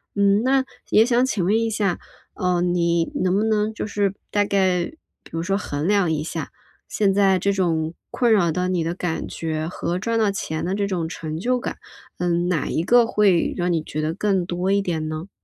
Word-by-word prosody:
嗯， 200 +1 +3
那 265 +1 +3 0.3
也 220 - +5
想 245 +1 +3
请 215 -8 -1
问 210 +5 +3
一 230 0 0
下， 205 -4 0 0.4
嗯， 180 -1 +1
你 170 -1 +1
能 185 0 +1
不 210 - +2
能 215 0 +1
就 - - -4
是 200 -2 0 0.2
大 205 0 +2
概 185 -3 +2
比 320 - -17
如 165 +1 -3
说 195 +2 0
衡 150 -6 -3
量 200 -3 +3
一 150 -1 -1
下， 160 -2 -5 0.4
现 200 -2 +1
在 195 -1 +4
这 200 +3 +1
种 165 -4 0 0.2
困 240 -3 +1
扰 175 -6 +3
到 180 +2 -1
你 175 -3 0
的 170 - -2
感 175 -3 -3
觉 155 -1 -3
和 175 0 -3
赚 230 +3 -1
到 215 -3 +2
钱 160 -5 -4
的 185 - -1
这 200 -1 0
种 175 -4 -2
成 160 -2 -5
就 250 +7 0
感， - - -4 0.4
嗯， 175 0 +1
哪 165 -6 0
一 160 - 0
个 240 +5 +5
会 200 -6 +2
让 175 -1 0
你 160 - 0
觉 155 0 -4
得 155 +1 -1
更 195 -1 0
多 180 +2 -1
一 200 0 +3
点 160 -4 -2
呢？ 155 +5 -5
185 Hz, 230 characters per minute, -22 LUFS, 170-205 Hz, 0.4 s, 也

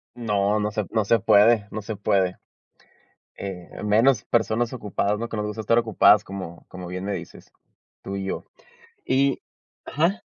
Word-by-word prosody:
No, 105 -3 0
no 105 0 -1
se 105 0 -2
no 110 -2 +1
se 115 +3 +3
puede, 105 +1 +4
no 110 - -4
se 110 0 -5
puede, 95 -2 +1 1.0
eh, 95 -3 -8
menos 110 +3 +3
personas 115 +1 +1
ocupadas, 105 -3 -1
¿no?, 115 - -3
que 115 - -6
nos 105 0 -2
gusta 105 +1 -5
estar 115 +2 +3
ocupadas 110 -3 +5
como 95 -3 -8
como 90 -1 -9
bien 90 +1 -5
me 100 - -2
dices, 85 -3 -9 0.5
tú 100 - -5
y 100 - -4
yo 95 - -4 0.6
y 135 0 +2 0.5
¿ajá? 170 +8 0
105 Hz, 170 wpm, -24 LUFS, 100-115 Hz, 1.0 s, ocupadas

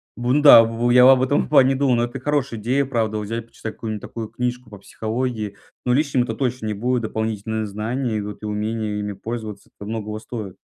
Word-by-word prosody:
Бун 125 +5 +1
да, 130 -5 +10
б 115 +1 -1
б 120 - +4
я 125 +1 +8
об 130 -1 +6
этом 135 +2 +2
в - - -11
плане 135 -2 +5
думаю, 130 -2 +2
но 120 - +2
это 120 +2 -4
хорошая 140 -4 -1
идея, 130 +6 +1
правда, 110 -4 -1
вот 105 - -3
взять 115 +2 -5
почитать 110 -1 -7
какую-нибудь 110 -2 -5
такую 115 -2 -6
книжку 125 0 -4
по 105 - -10
психологии. 110 0 -4 0.3
Ну, 125 - +2
лишним 140 -3 +2
это 110 -2 -4
точно 125 -3 -2
не 105 - -1
будет, 125 +4 0
дополнительные 110 0 -2
знания 110 +3 -2
идут 105 +1 -7
и - - -4
умение 105 0 -2
ими 105 0 -3
пользоваться, 110 -1 -7
это 100 - -9
многого 110 -1 -4
стоит. 110 -5 -7
115 Hz, 220 wpm, -22 LUFS, 110-125 Hz, 0.3 s, да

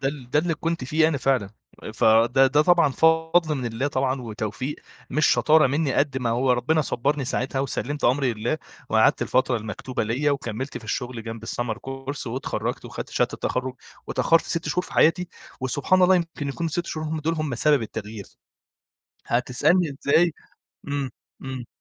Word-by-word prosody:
ده 135 - 0
ال 135 -4 -8
ده 150 - +3
اللي 165 +1 +1
كنت 165 -2 -3
فيه 155 +4 +3
أنا 150 -3 -1
فعلًا، 130 -7 +1 0.4
فده 115 +5 +5
ده 145 +3 +3
طبعًا 175 -1 +4
فضل 160 +2 +3
من 130 -3 -4
الله 115 +4 -2
طبعًا 130 -1 -1
وتوفيق، 110 +5 -4 0.3
مش 155 +3 +2
شطارة 155 -1 +5
منّي 140 +1 0
قد 140 -2 +1
ما 120 -3 -1
هو 125 +2 +2
ربنا 140 +6 +1
صبّرني 140 +1 -1
ساعتها 130 +2 -1
وسَلِّمت 140 +1 -3
أمري 130 0 +2
لله، 110 +8 -2 0.3
وقعدت 110 0 +4
الفترة 130 -1 +1
المكتوبة 110 +4 -4
ليَّ 130 +7 0
وكمِّلت 130 -1 -3
في 115 - -15
الشُغل 120 +1 -4
جنب 115 0 -7
الSummer 120 -1 -2
course 135 +1 -5
واتخرّجت 125 +3 -3
وخدت - - -7
شهادة - - 0
التخرّج، 130 0 -2 0.3
واتأخّرت 165 0 +3
6 165 -2 -2
شهور 180 +4 0
في - - -12
حياتي، 175 +2 +3 0.3
وسبحان 145 +8 +1
الله 185 +1 +6
يمكن 165 -4 -3
يكونوا 165 +4 -2
ال6 175 +2 -2
شهور 155 0 -4
هُم 155 0 -3
دُول 165 +2 0
هُم 155 -4 -2
سبب 145 +1 +3
التغيير، 110 -1 -6 1.0
هتسألني 140 +6 +2
إزاي 165 +4 +4 0.6
إمم، 140 -2 -2 0.3
إمم. 130 -2 -6
135 Hz, 170 wpm, -24 LUFS, 125-155 Hz, 1.0 s, الله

